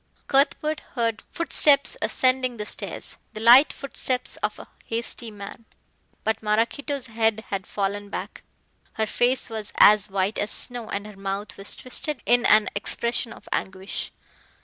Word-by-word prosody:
Cuthbert 300 +2 +1 0.2
heard 230 -3 -1
footsteps 300 - +4
ascending 255 -1 +1
the 210 - -4
stairs - - -4 0.2
the - - -7
light 240 +6 +7
footsteps 260 -2 -3
of - - -2
a - - -11 0.2
hasty 230 0 -2
man. 205 +2 -10 0.6
But 220 0 -1
Maraquito's 235 +6 -1
head 220 -2 0
had 195 -1 -3
fallen 205 0 -3
back, - - -6 0.5
her 220 - -1
face 245 +4 +1
was 220 -3 -5
as 210 -1 +6
white 195 +2 -1
as 205 - -1
snow 240 -3 -1
and 200 +1 -4
her 210 -1 -11
mouth 195 +1 -5
was 195 +1 -2
twisted 255 +2 -2
in 240 +1 +4
an 215 -1 +5
expression 235 +3 -2
of - - -13
anguish. 190 +1 -3
225 Hz, 150 wpm, -24 LUFS, 205-255 Hz, 0.6 s, light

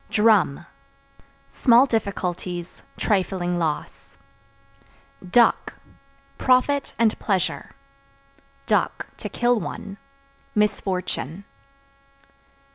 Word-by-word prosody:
Drum 210 -8 +3 0.8
Small 245 +1 +5
difficulties, 180 -6 -3 0.2
trifling 185 -3 0
loss. 160 -3 -4 1.1
Duck 240 +5 +3 0.7
Profit 265 +2 +2
and 225 -1 +2
pleasure; 190 -5 -2 0.9
(to - - -1
kill 240 -1 +2
one) 200 -1 -7 0.6
misfortune. 195 -4 -1
200 Hz, 60 wpm, -23 LUFS, 180-230 Hz, 1.1 s, Small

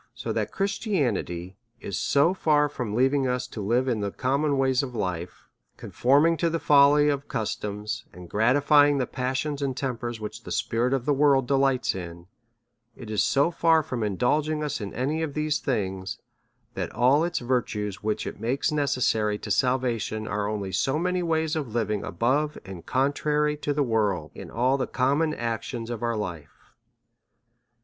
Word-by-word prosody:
So - - -4
that - - -2
Christianity 130 - -2 0.2
is 100 - -5
so 145 +6 +3
far 150 -5 +2
from 120 -7 -4
leaving 135 +2 +2
us 125 0 -1
to 110 - -6
live 120 +6 +1
in 120 -4 0
the 100 -1 -1
com 130 +7 -1
mon 145 -2 +1
ways 130 -1 +2
of 130 -3 -6
life, 90 -4 -4 0.3
conforming 145 +6 +2
to 170 - +1
the 165 - -1
folly 145 -1 +5
of 140 -1 -1
customs, 105 +1 -4
and 90 -1 -11
gratifying 145 - +4
the 130 - +1
passions 135 +4 -2
and 135 -2 -2
tempers 120 -4 -3
which 110 +1 -7
the - - -9
spirit 115 +3 0
of 130 -2 -3
the 145 - +3
world 140 -2 +3
delights 135 -1 +2
in; 85 -2 -8 0.7
it 110 -3 -9
is 105 - +2
so 140 +5 +2
far 165 -1 +3
from 130 -6 -4
in 105 -2 -1
dulging 150 +4 +1
us 145 -6 -3
in 100 - -5
any 145 +6 -1
of 155 -3 -3
these 150 0 0
things, 95 -7 -2 0.6
that - - -4
all 130 +7 +4
its 175 - -1
virtues 110 -5 -2
which 105 0 -2
it - - -6
makes 130 +7 0
necessary 125 -8 +1
to 105 - -7
salvation 115 -2 0
are 105 0 -1
only 100 -3 -3
so 135 - 0
many 180 +2 0
ways 160 -1 0
of 135 -8 -4
living 105 -3 0
above, 135 - 0
and 95 -3 -9
contrary 150 +3 +1
to, 150 0 -3
the 145 0 +1
world 110 -6 0
in - - -9
all 130 +4 +1
the 130 - -1
common 145 +5 +1
actions 115 0 -4
of 115 - -5
our 115 -1 -1
life. 85 -8 -7
130 Hz, 175 wpm, -26 LUFS, 110-145 Hz, 0.7 s, folly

